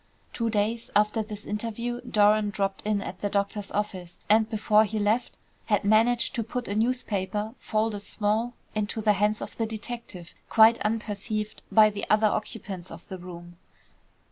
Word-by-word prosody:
Two 230 -1 -1
days 220 +2 -1
after 210 +2 +3
this 210 -1 -7
interview 235 +3 -3
Doran 210 0 +4
dropped 195 -1 -2
in 205 -2 +1
at 180 - -7
the 205 - 0
doctor's 200 0 -1
office, 185 -4 -4
and 220 +1 +4
before 215 -1 +4
he 220 0 -3
left 215 +4 0 0.3
had 210 -3 +2
managed 230 +4 +3
to 235 -3 -1
put 245 +2 -4
a 200 - -2
newspaper, 215 -2 -1
folded 215 -1 -1
small, 215 +4 -1 0.2
into 215 +1 -2
the 215 -1 +3
hands 210 +2 +1
of - - -8
the 225 - 0
detective, 220 -5 -6 0.2
quite 225 +1 +6
unperceived 215 0 -3
by 215 -1 +6
the 205 +1 -5
other 215 +1 +4
occupants 205 -4 -2
of 165 +1 -11
the 190 - -6
room. 175 -1 -10
215 Hz, 165 wpm, -27 LUFS, 205-225 Hz, 0.3 s, quite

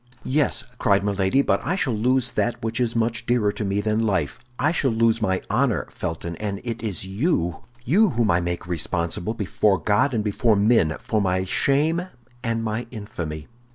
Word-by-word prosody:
"Yes," 145 +2 +1 0.2
cried 100 -1 +3
Milady, 100 +6 +2
"but - - +1
I 180 - 0
shall 135 -10 0
lose 120 +2 +1
that 120 -2 -1
which 115 +1 -2
is 120 -2 0
much 115 +1 -1
dearer 120 -4 +2
to 105 - -5
me 100 0 0
than 110 +1 0
life, 95 -9 0 0.2
I 155 - +2
shall 145 -5 +1
lose 115 0 +2
my 95 -3 0
honor, 120 +2 +1
Felton; 85 +1 -4
and 100 -2 -3
it 115 -1 -4
is 100 -5 -3
you, 95 - 0 0.3
you 205 +9 +4
whom 115 - +1
I 85 +1 +2
make 85 0 -3
responsible, 85 +4 -2
before 105 -1 +1
God 105 - +2
and 110 - 0
before 110 +2 +2
men, 100 -6 +3
for 110 -2 -1
my 95 -1 +1
shame 150 - +2 0.4
and 115 -2 -1
my 110 +2 -2
infamy." 85 -9 -6
110 Hz, 185 wpm, -23 LUFS, 95-120 Hz, 0.4 s, you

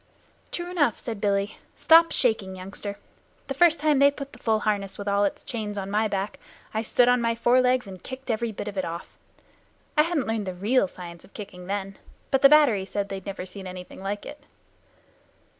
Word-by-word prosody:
"True 350 0 -4
enough," 290 -11 +2
said 225 -4 -5
Billy. 200 0 0 0.2
"Stop 330 +1 +6
shaking, 215 -6 +1
youngster. 195 +2 -7 0.5
The 270 - -3
first 330 +3 +4
time 300 -2 +3
they 280 0 +7
put 280 0 -8
the - - -13
full 220 -2 +1
harness 200 -2 -1
with 205 - -6
all 200 0 +3
its 200 - -3
chains 210 -4 -4
on 195 0 -4
my 215 +1 +2
back 200 0 -3 0.3
I 220 - 0
stood 240 +2 +3
on 245 0 +4
my 230 0 +1
forelegs 250 +2 +3
and 190 -3 -10
kicked 260 -1 -5
every 225 +1 -1
bit 210 - -6
of 200 -2 -3
it - - 0
off. 170 +1 -7 0.8
I 300 - +6
hadn't 315 -4 0
learned 220 -3 -2
the 185 - -4
real 210 +4 +2
science 170 -2 -10
of - - -20
kicking 185 -4 -9
then, 195 0 -4 0.3
but 270 - +3
the 275 - +9
battery 280 -10 +5
said 200 +1 -3
they 195 - -4
had 190 - -11
never 195 -2 -5
seen 190 0 -8
anything 180 0 -9
like 200 +1 -4
it." 295 - -10
210 Hz, 210 wpm, -26 LUFS, 195-255 Hz, 0.8 s, the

